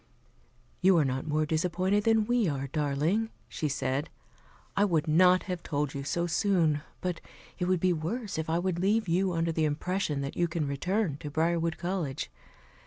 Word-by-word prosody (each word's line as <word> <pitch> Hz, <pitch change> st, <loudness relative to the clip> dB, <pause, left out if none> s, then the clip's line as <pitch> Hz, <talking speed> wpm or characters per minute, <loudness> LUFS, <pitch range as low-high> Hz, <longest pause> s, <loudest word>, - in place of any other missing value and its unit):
"You 185 Hz, -1 st, +5 dB
are 155 Hz, -, +4 dB
not 130 Hz, +2 st, -2 dB
more 155 Hz, 0 st, +1 dB
disappointed 180 Hz, +6 st, +1 dB
than 225 Hz, -1 st, +4 dB
we 240 Hz, -2 st, +2 dB
are, 140 Hz, -3 st, -2 dB
darling," 150 Hz, -, 0 dB, 0.2 s
she 155 Hz, -, -3 dB
said. 135 Hz, +2 st, -1 dB, 0.7 s
"I 200 Hz, -, +3 dB
would 165 Hz, -6 st, +1 dB
not 180 Hz, +4 st, +5 dB
have 180 Hz, -3 st, -4 dB
told 145 Hz, -3 st, -2 dB
you 140 Hz, -1 st, -4 dB
so 170 Hz, +4 st, -1 dB
soon, 170 Hz, -4 st, +2 dB, 0.2 s
but 180 Hz, -2 st, -2 dB, 0.4 s
it 180 Hz, -, 0 dB
would 185 Hz, 0 st, +2 dB
be 185 Hz, +1 st, +3 dB
worse 195 Hz, +5 st, -3 dB
if 160 Hz, -, -3 dB
I 165 Hz, -, +2 dB
would 175 Hz, -1 st, -1 dB
leave 210 Hz, +3 st, +2 dB
you 180 Hz, +3 st, +2 dB
under 165 Hz, 0 st, 0 dB
the 160 Hz, -1 st, +1 dB
impression 155 Hz, 0 st, -1 dB
that 140 Hz, -, -4 dB
you 175 Hz, -, +2 dB
can 160 Hz, -2 st, -2 dB
return 175 Hz, +3 st, -1 dB
to 150 Hz, -, -6 dB
Briarwood 165 Hz, +2 st, 0 dB
College. 175 Hz, -7 st, -3 dB
170 Hz, 180 wpm, -29 LUFS, 150-185 Hz, 0.7 s, You